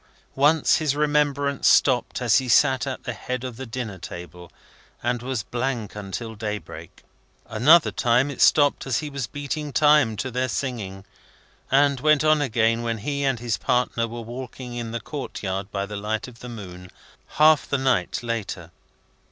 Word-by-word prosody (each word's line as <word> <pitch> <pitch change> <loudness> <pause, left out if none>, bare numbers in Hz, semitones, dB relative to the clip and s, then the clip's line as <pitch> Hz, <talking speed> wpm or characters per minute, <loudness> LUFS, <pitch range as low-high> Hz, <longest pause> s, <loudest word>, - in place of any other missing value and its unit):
Once, 145 +3 +3
his 150 -3 0
remembrance 145 -2 +1
stopped 125 -1 +3
as 120 +2 +4
he 130 -1 -5
sat 130 +3 +4
at 130 - -5
the 125 - -4
head 125 +3 -5
of 130 -2 -5
the 130 +2 -7
dinner 115 -5 -5
table, 85 0 -9 0.5
and 120 0 -1
was 125 -3 -3
blank 120 -4 -3
until 105 +3 -6
daybreak. 105 -1 -7 0.4
Another 150 +10 +5
time, 125 +3 +2
it 130 - -6
stopped 145 -2 +4
as 130 - +1
he 150 -2 -4
was 135 -4 -4
beating 145 +2 -5
time 145 -7 +4
to 130 +5 -3
their 130 +1 -1
singing, 105 -8 -4 0.6
and 140 0 +3
went 150 +2 +3
on 155 -1 +4
again 115 -3 +1
when 115 -1 -2
he 140 +5 -3
and 135 -3 +1
his 115 -4 -2
partner 115 +2 0
were 120 +1 -7
walking 125 +1 -8
in 120 -1 -4
the 120 +1 -4
court 135 +1 -7
yard 95 0 -3
by 100 -1 -2
the 105 +1 -6
light 105 +3 -3
of 120 -2 -14
the 125 - -9
moon, 90 -5 -9 0.5
half 155 0 +5
the 140 - +1
night 130 -7 0
later. 105 -7 -4
125 Hz, 175 wpm, -24 LUFS, 110-140 Hz, 0.6 s, Another